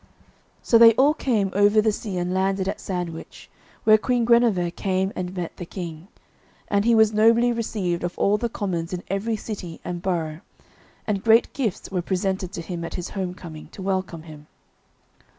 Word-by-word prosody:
So 230 - +4
they 230 0 +9
all 280 +4 +4
came 215 -10 0
over 205 +2 +4
sea, 205 -2 -5
and 175 +1 -1
landed 190 0 0
at - - -3
Sandwich, 175 -3 -6 0.3
where 215 0 +6
Queen 245 0 +1
Guenever 230 -7 +3
came 190 +1 -1
and 185 0 -4
met 175 -2 -5
the 175 - -6
King. 170 -2 -7 0.6
And 200 +1 +1
he 235 0 +4
was 220 -1 +4
nobly 230 +3 +4
received 195 -7 -2
of 175 0 -4
all 205 +1 +2
the 235 - -1
commons 180 -6 -3
in 180 - -4
every 200 +4 -1
city 195 -6 -7
and 175 -1 -4
borough, 165 -4 -2 0.7
and 205 -2 -2
great 225 +1 +4
gifts 225 -10 -3
were 185 -2 -1
presented 190 0 -2
to 170 - -5
him 170 -1 -5
at 165 - -5
his 180 0 -5
home 185 -2 -4
coming, 160 -4 -10
to 190 - -8
welcome 185 -4 -2
him. 150 -2 -12
190 Hz, 180 wpm, -24 LUFS, 175-215 Hz, 0.7 s, they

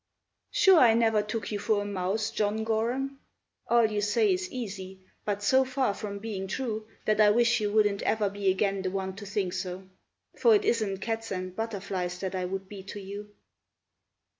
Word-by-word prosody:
"Sure 390 -8 +6
I 230 -3 +6
never 225 -2 +3
took 215 +1 -4
you 205 - -2
for 205 0 +1
a - - -7
mouse, 205 +2 -1
John 215 0 0
Gorham; 245 +5 -1 0.5
All 235 -1 +5
you 210 -1 0
say 380 - +3
is 365 0 -3
easy, 190 -6 -6 0.3
but 205 -1 -2
so 260 +6 +5
far 260 -4 0
from 200 0 -5
being 200 -2 -5
true 220 0 -3 0.2
That 215 0 +3
I 210 - +7
wish 235 +2 +3
you 205 -1 0
wouldn't 205 -2 +2
ever 215 -2 +1
be 200 0 0
again 195 +1 +1
the 190 - -1
one 190 0 -3
to 205 -1 -8
think 195 -3 -1
so; 185 0 -5 0.5
For 460 -2 +5
it 415 0 +1
isn't 210 - 0
cats 225 0 -3
and 185 -1 -4
butterflies 190 -5 -3
that 190 -1 -3
I 185 -1 -1
would 190 +1 -4
be 200 0 -8
to 195 +2 -8
you." 200 +1 -8
210 Hz, 190 wpm, -28 LUFS, 195-225 Hz, 0.5 s, I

